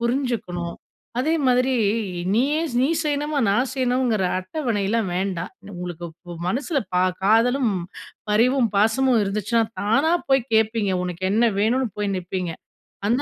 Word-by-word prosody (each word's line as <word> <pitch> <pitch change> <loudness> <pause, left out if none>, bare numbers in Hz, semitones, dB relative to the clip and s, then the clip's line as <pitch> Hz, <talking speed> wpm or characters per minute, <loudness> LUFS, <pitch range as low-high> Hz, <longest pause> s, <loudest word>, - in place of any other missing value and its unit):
புருஞ்சுக்கணும். 235 -9 -2 0.4
அதே 295 +6 +1
மாதிரி, 255 +1 +3 0.6
நீயே 275 +8 +2 0.2
நீ 265 - +3
செய்யணுமா, 295 0 -1
நான் 245 +7 +2
செய்யணுங்கிற 250 -6 +1
அட்டவணைலாம் 210 - -1
வேண்டாம். 185 -1 -2 0.2
உங்களுக்கு 175 -1 -6 0.2
பு - - -6
மனசுல 280 - 0 0.2
ப - - +2 0.3
காதலும், 230 +4 +3 0.6
பரிவும், 240 +3 +3
பாசமும் 225 +4 +3
இருந்துச்சுனா, 210 +3 +1 0.2
தானா 275 +10 +2 0.2
போய் 270 -1 +4
கேப்பீங்க. 220 -2 +2
உனக்கு 180 +1 -5
என்ன 230 +3 +3
வேணுனு? 245 +5 +2
போய் 205 -1 0
நிப்பீங்க, 180 -1 -3 0.6
அந்த 250 +4 +2
230 Hz, 125 wpm, -23 LUFS, 195-260 Hz, 0.6 s, போய்